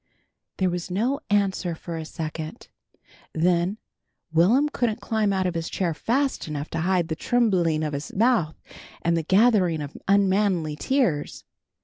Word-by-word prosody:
There 185 Hz, -2 st, +1 dB
was 175 Hz, 0 st, -4 dB
no 235 Hz, +10 st, 0 dB
answer 195 Hz, -4 st, +1 dB
for 170 Hz, +1 st, -7 dB
a 160 Hz, -1 st, -5 dB
second. 155 Hz, -1 st, -6 dB, 0.7 s
Then 175 Hz, +4 st, +1 dB, 0.6 s
Will'm 220 Hz, -, +4 dB
couldn't 240 Hz, -6 st, -1 dB
climb 220 Hz, -4 st, 0 dB
out 190 Hz, -1 st, 0 dB
of 180 Hz, -, 0 dB
his 165 Hz, -1 st, -3 dB
chair 175 Hz, -4 st, -1 dB
fast 265 Hz, -, -1 dB
enough 150 Hz, -1 st, -5 dB
to -, -, -2 dB
hide 180 Hz, -1 st, +1 dB
the 160 Hz, -, -2 dB
trembling 180 Hz, -8 st, +1 dB
of 150 Hz, -1 st, -2 dB
his 140 Hz, +1 st, -5 dB
mouth 220 Hz, -7 st, +1 dB, 0.4 s
and 170 Hz, 0 st, +2 dB
the 165 Hz, -, +1 dB
gathering 190 Hz, -2 st, +3 dB
of 145 Hz, -1 st, -6 dB
unmanly 195 Hz, -5 st, +2 dB
tears. 190 Hz, -, -1 dB
180 Hz, 150 wpm, -24 LUFS, 160-215 Hz, 0.7 s, Will'm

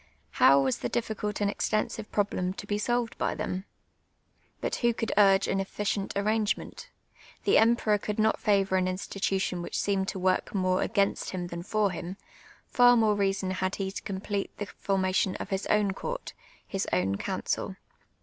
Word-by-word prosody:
How 140 Hz, +1 st, +8 dB
was 135 Hz, -2 st, +1 dB
the -, -, -2 dB
difficult 210 Hz, -3 st, -2 dB
and 205 Hz, -, +3 dB
extensive 215 Hz, 0 st, -2 dB
problem 185 Hz, -3 st, 0 dB
to 205 Hz, -, -8 dB
be 205 Hz, 0 st, -1 dB
solved 240 Hz, +1 st, 0 dB
by -, -, 0 dB
them? 185 Hz, +1 st, -3 dB, 0.9 s
But -, -, -2 dB
who 235 Hz, -1 st, +2 dB
could 225 Hz, -, -2 dB
urge 195 Hz, -1 st, +5 dB
an 195 Hz, -, 0 dB
efficient 195 Hz, +1 st, -2 dB
arrangement? 210 Hz, +1 st, -1 dB, 0.5 s
The -, -, +5 dB
emperor 225 Hz, -2 st, +3 dB
could 210 Hz, +1 st, -4 dB
not 220 Hz, 0 st, +2 dB
favour 195 Hz, -2 st, +2 dB
an 185 Hz, 0 st, +1 dB
institution 190 Hz, -1 st, -2 dB
which -, -, -4 dB
seemed 195 Hz, -1 st, 0 dB
to -, -, -3 dB
work 185 Hz, +2 st, 0 dB
more 185 Hz, -1 st, +2 dB
against 200 Hz, -2 st, 0 dB
him 180 Hz, -2 st, -4 dB
than 170 Hz, 0 st, -5 dB
ibr 205 Hz, +2 st, +1 dB
him; 175 Hz, +2 st, -6 dB, 0.5 s
far 245 Hz, 0 st, +5 dB
more 220 Hz, -2 st, +4 dB
reason 195 Hz, -2 st, 0 dB
had 185 Hz, 0 st, -1 dB
he 190 Hz, -1 st, -3 dB
to -, -, -6 dB
complete 200 Hz, 0 st, -3 dB
the 205 Hz, -, -3 dB
fonnation 190 Hz, -1 st, 0 dB
of 200 Hz, -, -6 dB
his 195 Hz, 0 st, -1 dB
own 210 Hz, -2 st, +3 dB
court -, -, -5 dB, 0.2 s
— -, -, -29 dB
his 195 Hz, -1 st, -2 dB
oww 95 Hz, +2 st, +1 dB
council. -, -, -2 dB
195 Hz, 175 wpm, -28 LUFS, 185-210 Hz, 0.9 s, How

